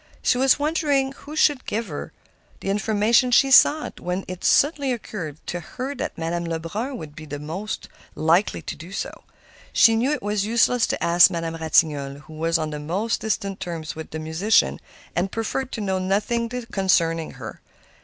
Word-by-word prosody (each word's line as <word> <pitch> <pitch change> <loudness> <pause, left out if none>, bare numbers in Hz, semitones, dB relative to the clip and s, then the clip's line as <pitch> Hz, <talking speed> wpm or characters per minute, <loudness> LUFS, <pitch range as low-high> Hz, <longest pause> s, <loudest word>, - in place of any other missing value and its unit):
She 245 - +2
was 265 0 +5
wondering 290 -3 +1
who 295 +2 -10
could 290 -4 +3
give 225 +2 -1
her 150 -7 -6 0.5
the 195 - -1
information 215 +4 +2
she 270 +2 +4
sought, 300 +4 +5
when 180 +2 -3
it 185 0 -7
suddenly 285 -2 +3
occurred 180 - -5
to 175 - -3
her 255 - -5
that 280 - -5
Madame 170 +1 -2
Lebrun 170 +11 -4
would 150 -7 -9
be 155 - -9
the 145 -1 -6
one 150 - -9
most 190 +7 -5 0.3
likely 165 +2 +2
to - - -5
do 170 +3 -11
so. - - -6 0.5
She 225 - +6
knew 245 +6 +1
it 300 - -2
was 205 -1 0
useless 235 +2 +3
to - - -2
ask 170 +1 +7
Madame 165 -2 -3
Ratignolle, 150 -3 +1
who 155 - -14
was 165 +2 +1
on 155 -1 -3
the 150 - -5
most 190 +10 -2
distant 200 -3 -2
terms 170 -4 -5
with 160 0 -7
the 160 - -5
musician, 160 - +2 0.4
and 185 +3 0
preferred 250 +3 -3
to 220 - -3
know 190 -2 -1
nothing 210 +5 0
concerning 190 -9 0
her. 115 -4 -9
195 Hz, 185 wpm, -23 LUFS, 165-235 Hz, 0.5 s, ask